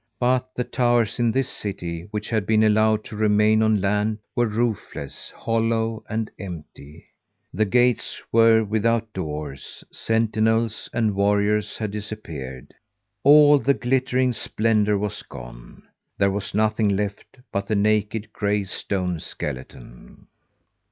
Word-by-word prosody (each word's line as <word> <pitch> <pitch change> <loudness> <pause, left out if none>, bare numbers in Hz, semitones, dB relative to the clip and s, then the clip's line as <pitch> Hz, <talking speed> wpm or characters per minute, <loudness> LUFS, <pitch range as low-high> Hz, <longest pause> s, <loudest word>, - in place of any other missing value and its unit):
But 130 +1 0
the 125 - -1
towers 120 -3 +1
in 120 -1 +3
this 130 +3 0
city, 85 -4 -5
which 105 +1 -5
had 110 -3 0
been 110 0 +4
allowed 110 0 +3
to 110 - -9
remain 105 +1 +3
on 110 -1 +3
land, 105 +2 0 0.2
were 120 -1 +2
roofless, 110 - -3
hollow 115 -1 -1
and 110 0 -2
empty. 80 -4 -10 0.5
The 110 +4 +2
gates 125 +3 +1
were 115 0 +5
without 110 +1 0
doors; 75 -5 -6
sentinels 115 0 0
and 110 -3 +1
warriors 105 +1 +1
had 110 -2 -3
disappeared. 80 -12 -7 0.5
All 145 0 +7
the 140 +1 +2
glittering 125 +1 +1
splendour 105 -2 +1
was 105 0 -3
gone. - - -12 0.3
There 100 0 +3
was 100 0 -4
nothing 110 0 +2
left 100 +4 -3
but 100 0 -2
the 110 - 0
naked, 105 +1 0
gray 105 0 0
stone 90 -2 -3
skeleton. 65 -4 -8
110 Hz, 130 wpm, -23 LUFS, 100-115 Hz, 0.5 s, All